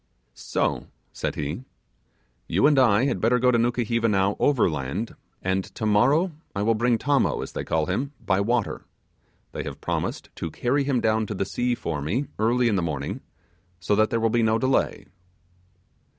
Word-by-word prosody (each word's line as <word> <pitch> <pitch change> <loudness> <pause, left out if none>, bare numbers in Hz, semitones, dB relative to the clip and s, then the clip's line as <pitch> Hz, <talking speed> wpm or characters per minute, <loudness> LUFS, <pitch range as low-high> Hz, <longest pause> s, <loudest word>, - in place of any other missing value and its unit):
'So,' - - -2 0.3
said - - -3
he, 75 - -4 0.8
'you 95 +5 +2
and 145 -2 +5
I 120 -1 +4
had 140 - -1
better 120 +3 +3
go 125 +1 +3
to 120 - +3
Nukuheva 115 -1 +1
now 100 0 +2
overland, 95 - 0 0.3
and 95 +1 0
tomorrow 125 - +3 0.2
I 100 - 0
will 115 +2 +3
bring 120 +2 +2
Tommo, 140 +4 +1
as - - -8
they - - -4
call 80 -1 0
him, 125 - -2
by 95 0 +1
water; 115 +1 0 0.7
they - - -4
have - - -7
promised - - -3
to 85 - -3
carry 135 - 0
him 130 -4 +1
down 110 -1 +1
to 105 - -4
the 95 - -1
sea 120 +4 -1
for 80 -9 -4
me 105 - -1
early 120 +3 +2
in 105 -4 +2
the - - +1
morning, 80 -5 -3 0.6
so 90 +4 0
that 110 +1 +3
there 115 - 0
will 115 0 +1
be 120 - +2
no 110 0 +3
delay. 130 +3 0
115 Hz, 180 wpm, -25 LUFS, 95-125 Hz, 0.8 s, and